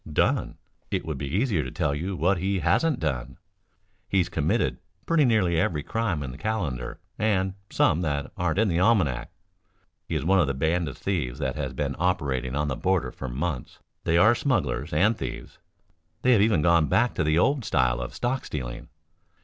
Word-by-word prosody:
"Done? - - +1 0.3
It - - -2
would 75 -4 -4
be 70 - -3
easier 95 - +1
to 65 - -5
tell 70 - -1
you 90 +7 -3
what 90 +2 +1
he 95 +2 0
hasn't 125 - +2
done. 65 -7 -3 0.7
He's 90 -3 +2
committed 80 -4 0 0.3
pretty 165 -3 +3
nearly 95 -8 +2
every 75 -3 0
crime 105 -10 -1
in 65 - -5
the 65 - -11
calendar 80 - -3 0.2
and 95 -3 +1 0.2
some 80 - +2
that 70 -4 -2
aren't 90 -4 -1
in 110 +1 +3
the 85 -3 +1
almanac. 85 - +2 0.8
He 80 - -3
is 75 -2 -1
one 95 +2 +4
of 80 -6 +2
a 70 - -1
band 80 +4 0
of 70 - -7
thieves 75 -11 -2
that 65 -3 -2
has 70 -4 -3
been - - -2
operating 70 -8 0
on 75 0 0
the 65 - -1
border 90 -8 0
for 65 - -7
months. 70 +1 -4 0.3
They 80 - +2
are 110 +6 +6
smugglers 85 - -1
and 110 +4 +3
thieves. 65 -9 -7 0.6
They 125 - +4
have 115 -5 +5
even 105 -8 +3
gone 85 -2 +4
back - - +2
to - - 0
the 75 +1 +2
old 135 +8 +2
style - - +1
of 65 +5 -6
stock 130 +2 -1
stealing. - - -6
80 Hz, 190 wpm, -26 LUFS, 70-100 Hz, 0.8 s, are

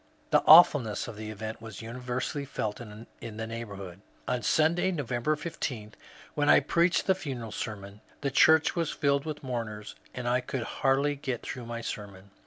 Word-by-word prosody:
The 150 - +5
awfulness 145 -9 +7
of 115 - -7
the 110 0 -7
event 110 +1 -6
was 110 -2 -9
universally 125 +4 -4
felt 110 -5 -4
in 110 0 -10 0.2
the 110 0 -6
neighbourhood. 100 -5 -7 0.3
On 125 -1 -1
Sunday, 160 - +2
November 145 -2 -1
16, 125 -9 -5 0.4
when 145 0 +1
I - - +8
preached 170 +1 +2
the 190 - +4
funeral 130 - -6
sermon, 100 -1 -6 0.2
the 140 - -1
church 160 +4 +5
was 170 -3 0
filled 140 0 0
with 150 -2 -5
mourners, 115 -5 -5 0.2
and 125 -1 -4
I 125 +1 +2
could 125 -1 -4
hardly 135 +4 +1
get 135 -4 -4
through 125 -3 -6
my 115 0 -5
sermon. 100 -3 -7
120 Hz, 170 wpm, -28 LUFS, 110-145 Hz, 0.4 s, I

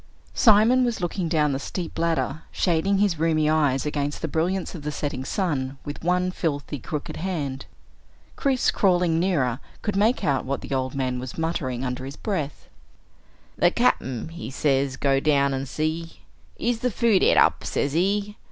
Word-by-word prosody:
Simon 225 +3 +5
was 240 -2 0
looking 175 -1 -2
down 150 -3 +2
the 135 - -1
steep 175 +4 -5
ladder, 160 -3 0
shading 185 +3 +1
his 195 -5 +1
rheumy 155 -1 +2
eyes 150 -4 +2
against 145 0 -2
the - - +1
brilliance 175 +4 -1
of 170 - -7
the 150 +1 -3
setting 145 -3 -3
sun 135 -5 -2
with 145 +2 -7
one 180 +1 +1
filthy, 145 -5 -3
crooked 150 +4 -5
hand. 150 -7 -3 0.7
Chris, 265 -2 +1
crawling 175 -4 +2
nearer, 145 -9 +1 0.2
could 210 -2 -1
make 215 +3 +2
out 140 -6 +1
what 140 +1 -3
the - - -5
old 130 0 -1
man 130 -2 -1
was 125 0 -7
muttering 140 -6 -2
under 125 0 -3
his 135 +2 -7
breath. 160 -9 -3 0.9
"The - - +5
Cap'n, 130 +2 0
he 165 -9 -7
say 135 0 +1
go 135 -1 +3
down 140 -1 +2
an' 135 +1 -3
see, 160 +4 -3 0.4
is 235 -1 0
the 250 - 0
food 225 -3 +3
et - - +4
up, - - +4
sez 140 0 -1
he. 200 +5 0
155 Hz, 170 wpm, -24 LUFS, 135-185 Hz, 0.9 s, Simon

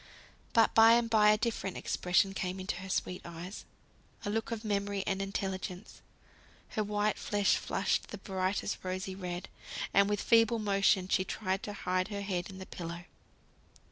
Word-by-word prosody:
But 225 -1 +5
by 225 +1 +8
and 235 0 +3
by 210 -1 +6
a 215 - +5
different 215 -4 -2
expression 180 +2 +1
came 185 0 -3
into 185 -1 -3
her 190 +1 -8
sweet 180 -1 -1
eyes; 170 +3 -8 0.6
a 205 - -1
look 225 +1 -1
of 230 -1 -4
memory 200 -1 -1
and 195 -1 -1
intelligence; 190 0 -4 0.7
her 215 - -1
white 210 0 0
face 205 -1 +2
flushed - - 0
the 210 - -7
brightest 190 +1 -2
rosy 185 +1 -3
red, 180 -1 -5 0.5
and 200 0 +5
with 205 -1 0
feeble 230 +1 +4
motion 200 -3 +2
she 185 - +2
tried 190 0 -2
to 205 - -5
hide 185 -1 -1
her 205 -1 -4
head 185 -2 -2
in 190 - -9
the 190 - -7
pillow. 170 -1 -6
195 Hz, 170 wpm, -32 LUFS, 185-210 Hz, 0.7 s, by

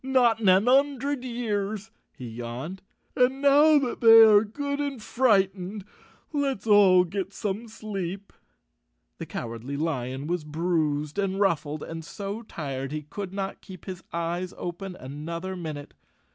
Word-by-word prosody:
" - - -48 0.2
Not 235 -2 +4
in 210 -4 +3
an 190 +5 +5
'un 275 +2 +4
dred 275 0 -3
years," 220 -3 -3 0.3
he 125 - -7
yawned. 120 +10 -6 0.3
"And 255 +2 +2
now 290 +2 +6
that 265 -4 -2
they 225 -1 +10
are 210 -1 +7
good 280 +6 -4
and 285 -3 -2
frightened 195 -4 +1 0.5
let's 275 -8 -1
all 200 -4 +6
get 190 +2 -4
some 210 +2 -4
sleep." 200 -3 -6 0.9
The - - -6
Cowardly 115 +4 -5
Lion 135 -3 -2
was 170 0 -2
bruised 155 0 -1
and 195 -1 -1
ruffled, 155 -6 0
and 165 0 -7
so 200 +7 -6
tired 135 - -5
he 155 0 -4
could 190 +6 -6
not 195 0 -4
keep 185 -4 -12
his 185 -2 -7
eyes 170 +2 -3
open 180 +2 -6
another 165 +7 -6
minute. 155 -5 -7
195 Hz, 150 wpm, -26 LUFS, 160-225 Hz, 0.9 s, they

